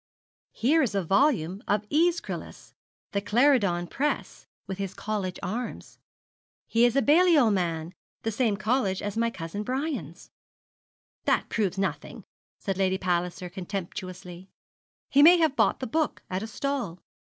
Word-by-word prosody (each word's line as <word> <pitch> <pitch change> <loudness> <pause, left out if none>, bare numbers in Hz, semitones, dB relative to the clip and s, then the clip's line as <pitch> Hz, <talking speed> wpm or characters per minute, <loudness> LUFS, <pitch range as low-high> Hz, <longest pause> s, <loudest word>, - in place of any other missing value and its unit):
'Here 300 +8 +2
is 240 -8 0
a 195 - +1
volume 195 - +2
of 210 +1 0
Æschylus 335 +3 -1 0.4
the 200 - -1
Clarendon 210 -6 +3
Press 285 - -3 0.2
with 190 0 -6
his 195 -1 -4
college 205 -4 -3
arms. 235 +5 -5 0.7
He 230 +1 +3
is 240 - +2
a 275 - +3
Balliol 305 -4 +5
man, 170 -3 -1 0.3
the 225 - -1
same 220 -2 +1
college 215 -2 0
as 205 -1 -3
my 230 +1 +1
cousin 185 -1 -6
Brian's.' 270 +7 -4 0.9
'That - - +1
proves 195 -4 -1
nothing,' 195 0 -3 0.3
said 195 -2 -3
Lady 190 -1 +2
Palliser, 180 0 -1
contemptuously. 185 -1 -7 0.6
'He 280 - +4
may 340 +4 +9
have 320 -4 +2
bought - - +2
the - - -1
book 310 +6 -1
at 185 +1 -1
a 220 - -4
stall. 235 -7 -3
205 Hz, 140 wpm, -27 LUFS, 185-265 Hz, 0.9 s, may